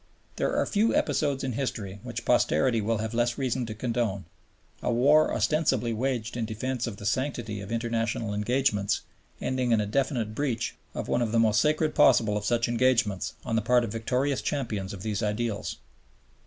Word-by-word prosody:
There -, -, 0 dB
are -, -, +2 dB
few 215 Hz, +2 st, +2 dB
episodes 145 Hz, -4 st, +1 dB
in 130 Hz, -, -1 dB
history 105 Hz, -6 st, -4 dB
which -, -, -6 dB
posterity 115 Hz, +9 st, +3 dB
will 115 Hz, +2 st, 0 dB
have 110 Hz, +2 st, -3 dB
less 120 Hz, 0 st, +1 dB
reason 130 Hz, -3 st, -1 dB
to 110 Hz, -, -6 dB
condone, 115 Hz, -5 st, -1 dB, 0.6 s
a -, -, 0 dB
war 145 Hz, +6 st, +4 dB
ostensibly 135 Hz, -7 st, +1 dB
waged 120 Hz, -1 st, -2 dB
in 115 Hz, -2 st, -1 dB
defense 120 Hz, +3 st, -3 dB
of 105 Hz, -4 st, -5 dB
the 100 Hz, -, -9 dB
sanctity 120 Hz, -3 st, -2 dB
of 100 Hz, +2 st, -8 dB
international 115 Hz, -2 st, -1 dB
engagements 105 Hz, -1 st, +1 dB, 0.4 s
ending 130 Hz, -2 st, -1 dB
in 115 Hz, -, +4 dB
a 105 Hz, -, 0 dB
definite 120 Hz, -1 st, -1 dB
breach 120 Hz, -3 st, -1 dB, 0.2 s
of -, -, -4 dB
one 120 Hz, -, +1 dB
of 115 Hz, -2 st, 0 dB
the 115 Hz, -, +2 dB
most 110 Hz, -2 st, +4 dB
sacred 155 Hz, 0 st, +1 dB
possible 110 Hz, -5 st, +4 dB
of 105 Hz, 0 st, -2 dB
such 115 Hz, 0 st, +1 dB
engagements 115 Hz, -5 st, +1 dB
on 115 Hz, -3 st, -1 dB
the 115 Hz, -, +2 dB
part 120 Hz, +2 st, +3 dB
of 115 Hz, -, -3 dB
victorious 125 Hz, +5 st, 0 dB
champions 110 Hz, -9 st, -2 dB
of 100 Hz, -2 st, -8 dB
these 105 Hz, -2 st, -2 dB
ideals. 105 Hz, 0 st, -2 dB
115 Hz, 180 wpm, -27 LUFS, 110-130 Hz, 0.6 s, war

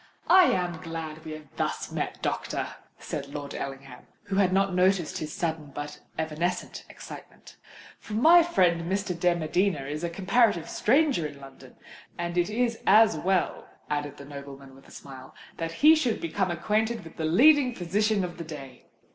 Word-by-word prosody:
"I 370 Hz, 0 st, +8 dB
am 175 Hz, -, 0 dB
glad 160 Hz, -2 st, -7 dB
we 155 Hz, -, -6 dB
have 155 Hz, -1 st, -10 dB
thus -, -, -2 dB
met, -, -, -4 dB
doctor," -, -, -2 dB, 0.3 s
said 140 Hz, -2 st, -5 dB
Lord 145 Hz, -1 st, -6 dB
Ellingham, 135 Hz, -2 st, -7 dB, 0.2 s
who 200 Hz, -2 st, -3 dB
had 190 Hz, -2 st, +3 dB
not 195 Hz, 0 st, +2 dB
noticed 180 Hz, -2 st, +2 dB
his 155 Hz, -1 st, -5 dB
sudden, 160 Hz, -3 st, -3 dB
but 145 Hz, 0 st, -6 dB, 0.2 s
evanescent 160 Hz, +3 st, -3 dB
excitement; -, -, -12 dB, 0.4 s
"for 215 Hz, -, -10 dB
my 325 Hz, +11 st, +7 dB
friend 180 Hz, -, +1 dB
Mr. 195 Hz, -1 st, -1 dB
de 175 Hz, 0 st, +3 dB
Medina 175 Hz, 0 st, 0 dB
is 150 Hz, +4 st, -5 dB
a 170 Hz, -, -1 dB
comparative 195 Hz, -1 st, +2 dB
stranger 265 Hz, -, +2 dB
in 145 Hz, -1 st, -12 dB
London, 135 Hz, -1 st, -14 dB, 0.4 s
and 175 Hz, 0 st, -3 dB
it 175 Hz, +2 st, +1 dB
is 230 Hz, +1 st, 0 dB
as 220 Hz, +2 st, +6 dB
well," 190 Hz, -1 st, -1 dB, 0.2 s
added 145 Hz, -1 st, -2 dB
the 140 Hz, -, -10 dB
nobleman, 140 Hz, -1 st, -10 dB
with 135 Hz, +1 st, -18 dB
a -, -, -17 dB
smile, 130 Hz, -1 st, -11 dB, 0.2 s
"that 165 Hz, 0 st, -3 dB
he 315 Hz, -, +10 dB
should 255 Hz, -8 st, 0 dB
become 185 Hz, +3 st, -1 dB
acquainted 215 Hz, +6 st, -1 dB
with 165 Hz, -, -13 dB
the 160 Hz, -, -2 dB
leading 255 Hz, -, +5 dB
physician 200 Hz, +3 st, 0 dB
of 175 Hz, -1 st, -6 dB
the -, -, -4 dB
day." 140 Hz, -5 st, -10 dB
175 Hz, 170 wpm, -27 LUFS, 150-205 Hz, 0.4 s, he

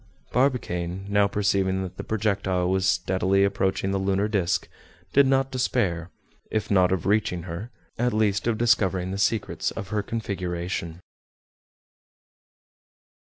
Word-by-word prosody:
Barbicane, 95 Hz, -9 st, 0 dB
now 100 Hz, 0 st, +4 dB
perceiving 95 Hz, -2 st, +1 dB
that 90 Hz, -, -7 dB
the -, -, -5 dB
projectile 95 Hz, -4 st, 0 dB
was 95 Hz, 0 st, +1 dB
steadily 95 Hz, +1 st, +2 dB
approaching 95 Hz, 0 st, 0 dB
the 100 Hz, -, 0 dB
lunar 95 Hz, +1 st, +1 dB
disc, 100 Hz, -5 st, 0 dB, 0.5 s
did 140 Hz, -1 st, +6 dB
not 135 Hz, 0 st, +2 dB
despair; 95 Hz, -9 st, 0 dB, 0.4 s
if 110 Hz, -1 st, -2 dB
not 90 Hz, -2 st, +4 dB
of 95 Hz, -3 st, -1 dB
reaching 100 Hz, -4 st, +1 dB
her, 90 Hz, +6 st, -6 dB, 0.3 s
at 125 Hz, +1 st, +2 dB
least 105 Hz, -1 st, +1 dB
of 115 Hz, -2 st, +1 dB
discovering 95 Hz, -6 st, +2 dB
the 100 Hz, -, -3 dB
secrets 110 Hz, +1 st, 0 dB
of 100 Hz, -, -7 dB
her 105 Hz, 0 st, 0 dB
configuration. 90 Hz, -5 st, -4 dB
95 Hz, 130 wpm, -25 LUFS, 95-110 Hz, 0.5 s, did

